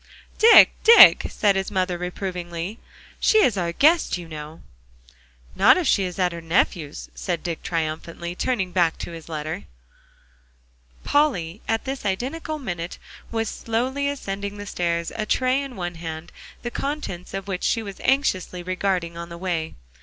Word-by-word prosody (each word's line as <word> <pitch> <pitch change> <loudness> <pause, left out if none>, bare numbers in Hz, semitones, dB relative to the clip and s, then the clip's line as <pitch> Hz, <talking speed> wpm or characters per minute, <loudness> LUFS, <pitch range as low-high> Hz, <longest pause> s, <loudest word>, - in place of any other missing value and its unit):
"Dick, 455 +1 +9
Dick," 460 +1 +9
said 205 -2 +2
his 195 0 -1
mother 185 -2 0
reprovingly, 180 +1 -5 0.4
"she 435 - +4
is 235 - +3
our 175 -3 -1
guest, 305 - +3
you 175 -2 -9
know." 155 0 -9 0.9
"Not 245 +8 +6
if 360 - -1
she 195 -8 +3
is 180 -1 -6
at 180 -2 +1
her 170 0 -7
nephew's," 165 -2 -1
said 175 -3 -3
Dick 170 -2 -4
triumphantly, 165 +1 -4
turning 190 -2 -1
back 175 -3 +2
to - - -6
his 165 -1 -10
letter. 155 -5 -5 1.4
Polly 215 - +1
at 225 0 -1
this 270 0 -4
identical 270 - -3
minute 175 - -5 0.3
was 225 -1 -1
slowly 255 +7 -2
ascending 200 -7 -5
the 205 - -7
stairs, 170 -3 -2
a 215 -1 -3
tray 255 +1 +2
in 275 -3 -7
one 175 -2 -4
hand, 165 -1 -7 0.3
the 240 - -4
contents 215 - -4
of 195 0 -5
which 185 -2 -4
she 225 - +1
was 200 -2 -8
anxiously 185 -10 0
regarding 185 -2 -1
on 170 0 -7
the 170 - -8
way. 170 -3 -3
185 Hz, 160 wpm, -23 LUFS, 170-230 Hz, 1.4 s, Dick